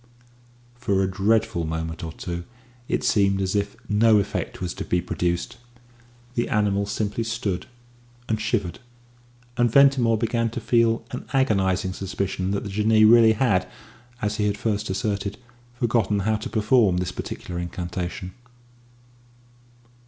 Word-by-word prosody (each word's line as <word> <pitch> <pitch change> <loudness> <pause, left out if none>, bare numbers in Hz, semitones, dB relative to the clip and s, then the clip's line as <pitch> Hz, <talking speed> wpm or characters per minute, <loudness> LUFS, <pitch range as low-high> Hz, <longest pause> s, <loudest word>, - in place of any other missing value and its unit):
For 100 -6 0
a - - +1
dreadful 105 0 +1
moment 80 0 -4
or 80 - -4
two 85 +1 -5 0.4
it - - -1
seemed 100 -2 +2
as 95 +1 -1
if 100 0 -1
no 110 +1 +4
effect 100 +1 -2
was 90 -2 -3
to - - -5
be 90 - 0
produced; 85 +4 -2 0.8
the 120 - -1
animal 100 -2 +1
simply 105 +2 -2
stood 115 -4 -3 0.6
and 110 -1 -1
shivered, 105 -5 -1 0.8
and 120 -1 +3
Ventimore 135 -4 +5
began 115 +1 0
to 120 - -5
feel 115 0 +2
an 125 - -6
agonising 95 -7 +1
suspicion 95 -1 -3
that 100 0 -1
the 105 - -5
Jinnee 110 +2 +4
really 115 0 +7
had, 105 -6 +1 0.5
as 105 +1 -1
he 105 - +1
had 100 0 -1
first 105 -1 -2
asserted, 100 +1 -2 0.4
forgotten 115 -4 +1
how 110 +2 +1
to - - -6
perform 105 -3 +3
this 90 0 -2
particular 90 -1 -6
incantation. 90 +1 -5
105 Hz, 140 wpm, -24 LUFS, 95-115 Hz, 0.8 s, really